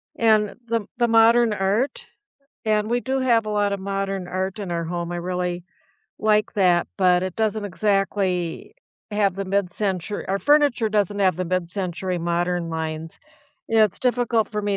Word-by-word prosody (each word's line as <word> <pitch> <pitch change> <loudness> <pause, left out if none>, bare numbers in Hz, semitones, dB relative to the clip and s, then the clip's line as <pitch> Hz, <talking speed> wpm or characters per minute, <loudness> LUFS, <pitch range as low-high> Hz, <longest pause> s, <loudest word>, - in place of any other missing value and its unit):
And 215 -2 +2
the 230 -3 -1
the 240 -1 +1
modern 230 +1 +5
art 210 +6 -1 0.6
And 215 -1 +1
we 240 +1 +1
do 265 +1 -1
have 235 -4 +2
a - - -4
lotta 205 -1 +1
modern 195 -1 -3
art 190 +2 -2
in 195 -4 -5
our 170 -1 -2
home. 170 0 -4
I 175 - -3
really 180 0 -3 0.5
like 215 -1 +2
that, 180 -5 +3
but 180 -1 +4
it 185 -1 -3
doesn't 220 -1 0
exactly 195 - -1 0.4
have 205 -3 +1
the 195 -1 -4
mid-centur 195 0 -2
our 195 +1 0
furniture 285 -5 +3
doesn't 205 -1 0
have 185 -4 +3
the 185 -1 -2
mid-century 185 0 -2
modern 175 0 -1
lines. 160 0 -5 0.5
It's 215 -3 +3
difficult 240 -3 +1
for 210 -1 -2
me 205 -1 -1
195 Hz, 160 wpm, -23 LUFS, 180-215 Hz, 0.6 s, modern